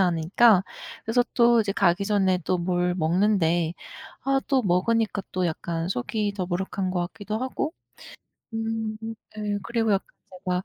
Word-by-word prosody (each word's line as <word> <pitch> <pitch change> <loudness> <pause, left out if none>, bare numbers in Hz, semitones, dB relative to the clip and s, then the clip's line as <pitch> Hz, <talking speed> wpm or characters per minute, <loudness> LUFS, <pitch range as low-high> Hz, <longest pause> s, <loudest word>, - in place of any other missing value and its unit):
않으니까 185 +4 +4 0.4
그래서 225 +2 +3
또 235 -1 +5
이제 205 -2 -1
가기 195 -2 +2
전에 195 -3 +2
또 185 - +1
뭘 180 0 0
먹는데 175 -1 +2 0.5
아 270 0 +2
또 265 -2 +3
먹으니까 205 +3 +1
또 185 -1 +1
약간 165 0 -3
속이 205 - -1
더부룩한 185 0 -2
것 180 -1 -1
같기도 210 +1 -4
하고. 260 +5 -2 0.8
음. 225 -1 -2 0.4
예. 210 -1 -1
그리고 230 -2 0
약간 195 - -1 0.4
제가 180 0 0
195 Hz, 275 characters per minute, -25 LUFS, 180-225 Hz, 0.8 s, 또